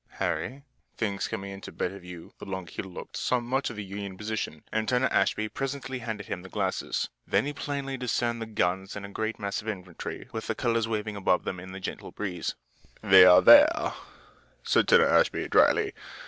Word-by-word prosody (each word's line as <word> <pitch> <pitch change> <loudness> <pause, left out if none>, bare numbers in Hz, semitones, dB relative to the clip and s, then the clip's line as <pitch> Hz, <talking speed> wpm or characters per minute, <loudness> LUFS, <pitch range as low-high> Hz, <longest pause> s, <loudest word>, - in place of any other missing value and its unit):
Harry, 135 +3 -2 0.3
things 100 -3 -1
coming 100 0 -5
into 95 0 -9
better 95 +2 -3
view, 90 -2 -11
the - - -8
longer 95 -3 -6
he - - -4
looked, 95 -2 -9
saw 125 - +1
much 130 +3 -1
of 115 - -7
the 105 - -5
Union 100 -1 -6
position, 105 -7 -4
and 110 0 -1
Turner 125 +1 +2
Ashby 110 - +1
presently 135 +1 -4
handed 110 -4 -5
him 90 - -5
the 95 - -11
glasses. 95 -2 -2 0.2
Then - - +2
he 145 - -3
plainly 140 -2 -4
discerned 120 -2 -1
the 115 - -4
guns 95 -2 -1
and 100 -1 -6
a - - -9
great 110 +2 -3
mass 100 0 -3
of 110 - -13
infantry, 90 -5 -6
with 110 0 -5
the - - -1
colors 115 -2 0
waving 105 -1 -3
above 95 -2 +1
them 90 - -4
in 95 +1 -9
the 95 - -7
gentle 95 - -6
breeze. 90 -5 -4 0.5
"They're 90 -1 +8
there," 305 +3 +7 0.7
said - - +3
Turner 475 -1 +6
Ashby, - - +2
dryly. 425 -2 +4
105 Hz, 190 wpm, -28 LUFS, 95-125 Hz, 0.7 s, They're